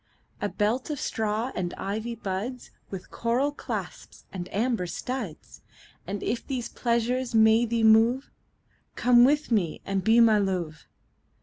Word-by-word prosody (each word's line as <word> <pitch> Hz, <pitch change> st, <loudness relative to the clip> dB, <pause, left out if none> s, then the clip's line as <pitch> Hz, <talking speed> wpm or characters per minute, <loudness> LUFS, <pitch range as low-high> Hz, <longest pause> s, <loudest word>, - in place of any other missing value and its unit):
A -, -, 0 dB
belt 225 Hz, +7 st, -1 dB
of 295 Hz, -3 st, -3 dB
straw 220 Hz, +3 st, -2 dB
and 175 Hz, -1 st, -3 dB
ivy 220 Hz, +4 st, -4 dB
buds 215 Hz, +6 st, -5 dB, 0.2 s
With 190 Hz, -2 st, -8 dB
coral 245 Hz, +5 st, 0 dB
clasps 290 Hz, -, -7 dB
and 180 Hz, -2 st, -6 dB
amber 225 Hz, -3 st, 0 dB
studs: 225 Hz, -2 st, -6 dB, 0.5 s
And 200 Hz, +1 st, -4 dB
if 235 Hz, -, -2 dB
these 250 Hz, -4 st, -3 dB
pleasures 240 Hz, +1 st, -1 dB
may 220 Hz, +1 st, +5 dB
thee 230 Hz, 0 st, 0 dB
move, 225 Hz, +4 st, +4 dB, 0.6 s
Come 245 Hz, 0 st, +4 dB
live 240 Hz, -, +9 dB, 0.2 s
with -, -, -18 dB
me 185 Hz, -8 st, +1 dB
and 195 Hz, -1 st, -1 dB
be 225 Hz, +4 st, +5 dB
my 220 Hz, -2 st, +6 dB
Love. 180 Hz, -6 st, -3 dB
225 Hz, 145 wpm, -26 LUFS, 195-240 Hz, 0.6 s, live